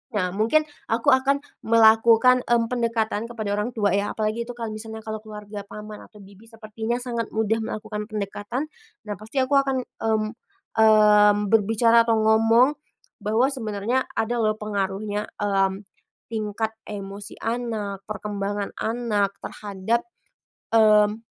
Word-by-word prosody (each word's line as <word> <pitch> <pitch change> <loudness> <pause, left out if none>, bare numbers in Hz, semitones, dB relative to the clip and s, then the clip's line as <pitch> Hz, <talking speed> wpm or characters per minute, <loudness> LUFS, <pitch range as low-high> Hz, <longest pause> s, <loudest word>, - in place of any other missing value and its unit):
nah 180 -3 0
mungkin 225 +10 +2 0.2
aku 230 +5 +2
akan 275 +2 +2 0.2
melakukan, 230 +2 +6
mmm, 235 -1 +2
pendekatan 230 -2 -1
kepada 220 -3 -5
orang 210 +4 -2
tua 205 -3 +1
ya, 200 +2 0
apalagi 220 +2 -2
itu 245 - -7
kalau 230 -2 -5
misalnya 220 0 -8
kalau 220 0 -5
keluarga 210 -1 -9
paman 210 0 -9
atau 210 -2 -16
bibi, 200 +3 -17
sepertinya 225 +1 -4
sangat 235 -2 -3
mudah 220 0 +1
melakukan 215 -1 -5
pendekatan. 215 +7 -4 0.3
Nah, 210 -1 -5
pasti 220 +5 -1
aku 260 +2 -2
akan, 270 -2 0
mmm 220 -2 -1 0.5
mmm, 210 -1 +6 0.2
berbicara 225 +2 +4
atau 230 - +4
ngomong 225 +5 +4 0.4
bahwa 220 +6 +2
sebenarnya 230 0 -1
ada 235 +2 -1
loh 215 -1 +1
pengaruhnya, 205 0 -3
mmm, 195 -1 0 0.5
tingkat 220 0 -2 0.2
emosi 200 0 -7
anak, 225 -4 -3
perkembangan 205 -1 -4
anak 220 -4 -1
terhadap, 205 - -3 0.7
mmm, 215 0 +4
220 Hz, 130 wpm, -24 LUFS, 210-230 Hz, 0.7 s, melakukan